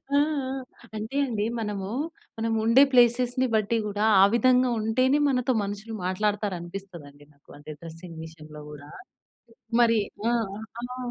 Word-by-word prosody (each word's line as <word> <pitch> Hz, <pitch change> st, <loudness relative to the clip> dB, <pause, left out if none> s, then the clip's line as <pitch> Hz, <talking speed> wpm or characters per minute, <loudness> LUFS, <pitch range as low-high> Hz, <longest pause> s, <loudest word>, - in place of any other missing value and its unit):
ఆ! -, -, +5 dB
ఆ! -, -, +6 dB, 0.8 s
అంటె 220 Hz, +6 st, -4 dB
అండి. 220 Hz, -5 st, -2 dB
మనమూ 205 Hz, -2 st, -4 dB, 0.5 s
మనము 225 Hz, 0 st, 0 dB
ఉండే 235 Hz, +5 st, +7 dB
ప్లేసెస్‌ని 245 Hz, +1 st, +4 dB
బట్టి 215 Hz, +1 st, +1 dB
గూడా, 210 Hz, +1 st, -1 dB, 0.2 s
ఆ -, -, +9 dB
విధంగా 255 Hz, +1 st, +4 dB
ఉంటేనే 255 Hz, +6 st, +2 dB
మనతో 250 Hz, -1 st, +1 dB
మనుషులు 205 Hz, +3 st, -6 dB
మాట్లాడతారు 205 Hz, +1 st, -1 dB
అనిపిస్తదండి 170 Hz, -5 st, -10 dB
నాకు. 140 Hz, -, -30 dB
అంటే 145 Hz, +1 st, -10 dB
డ్రెసింగ్ 165 Hz, 0 st, -10 dB
విషయంలో 155 Hz, -2 st, -12 dB
కూడా. 145 Hz, -1 st, -11 dB, 0.9 s
మరి 230 Hz, -1 st, +5 dB, 0.3 s
ఆ! -, -, +2 dB, 0.5 s
అలో 250 Hz, +1 st, -6 dB
210 Hz, 135 wpm, -26 LUFS, 175-240 Hz, 0.9 s, ఆ